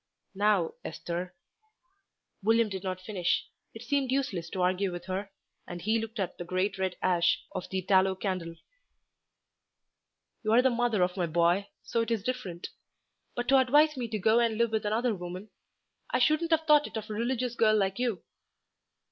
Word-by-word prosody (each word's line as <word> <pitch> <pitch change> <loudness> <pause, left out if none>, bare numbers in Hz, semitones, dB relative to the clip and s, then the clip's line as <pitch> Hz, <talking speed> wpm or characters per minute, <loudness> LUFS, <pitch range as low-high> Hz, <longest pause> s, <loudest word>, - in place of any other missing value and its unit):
"Now, 200 -4 +2
Esther 175 +2 -5 0.5
" 390 - -45
William 225 +1 +3
did 190 -1 -5
not 185 -1 -3
finish. 185 -2 -1 0.3
It 225 - -8
seemed 270 +1 0
useless 200 -12 -1
to 185 +1 -2
argue 185 +1 +1
with 175 0 -7
her, 190 +2 -3 0.4
and 175 - -6
he 220 +6 +1
looked 225 0 -6
at 190 - -3
the - - -3
great 185 +3 -1
red 190 -1 -1
ash 175 -2 +2
of - - -5
the 190 -1 -2
tallow 190 0 +3
candle. 185 -4 -3 1.9
"You 215 -1 +1
are 245 +2 +6
the 260 - +4
mother 235 -5 +1
of 180 +2 -1
my 175 -2 0
boy, 170 +4 +2 0.2
so 230 - -1
it 230 - -2
is 225 -4 -1
different; 225 -9 -4 0.7
but 240 0 -3
to 270 0 +6
advise 295 +4 +4
me 250 -3 -3
to 220 -1 -3
go 220 +4 +3
and 230 -2 +1
live 235 -1 +2
with 220 -1 -1
another 230 +3 +1
woman! 180 +2 -7 0.6
I - - +1
shouldn't 310 +6 +2
have 320 -1 +2
thought 300 -1 +5
it - - -7
of 215 0 -6
a - - -2
religious 240 +2 -1
girl 220 -2 +3
like 195 +1 0
you." 235 -8 -1
210 Hz, 185 wpm, -29 LUFS, 185-240 Hz, 1.9 s, are